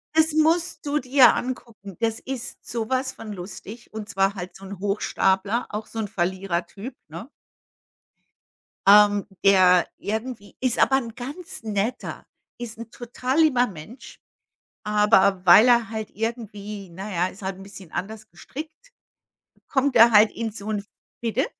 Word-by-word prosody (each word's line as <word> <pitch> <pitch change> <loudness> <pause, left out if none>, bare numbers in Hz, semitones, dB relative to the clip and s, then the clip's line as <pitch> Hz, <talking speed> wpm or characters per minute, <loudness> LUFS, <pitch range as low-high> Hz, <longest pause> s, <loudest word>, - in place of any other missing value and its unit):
Das 320 0 +4
musst 320 0 +1
du 290 +1 0
dir 255 -2 +6
angucken. 230 -6 -6
Das 225 -1 0
ist 260 -2 -6
sowas 255 +3 -2
von 215 -2 -8
lustig, 200 +5 -10
und 215 -1 -7
zwar 195 0 +1
halt 180 -1 -7
so 195 - -14
'n 195 0 -8
Hochstapler, 200 +2 0
auch 215 +1 -5
so 225 - -11
'n 215 -2 -2
Verlierertyp, 190 +5 -3
ne? - - -9 1.6
Ähm, 205 0 +6 0.2
der 185 -2 +6
irgendwie 220 0 -5
ist 255 -2 0
aber 270 - +4
'n 230 -3 -5
ganz 280 +2 -7
netter, 215 +3 -3 0.3
ist 230 -2 -7
'n 230 -1 -9
total 250 +4 -3
lieber 260 -6 +4
Mensch, 200 - -11 0.6
aber 210 -3 +3
weil 210 +7 +8
er 235 -2 +4
halt 220 -1 -5
irgendwie 210 -3 -5
na 195 +4 -7
ja, 175 +1 +1
ist 195 +2 -13
halt 190 0 -4
'n - - -11
bisschen 195 -3 -12
anders 215 +3 -6
gestrickt 310 - -10 0.7
kommt 265 -2 0
er 230 +1 +8
halt 210 +1 +7
in 225 -2 -4
so 205 0 -8
'n 205 -1 -2 0.4
bitte? 235 +4 0
220 Hz, 150 wpm, -24 LUFS, 195-250 Hz, 1.6 s, weil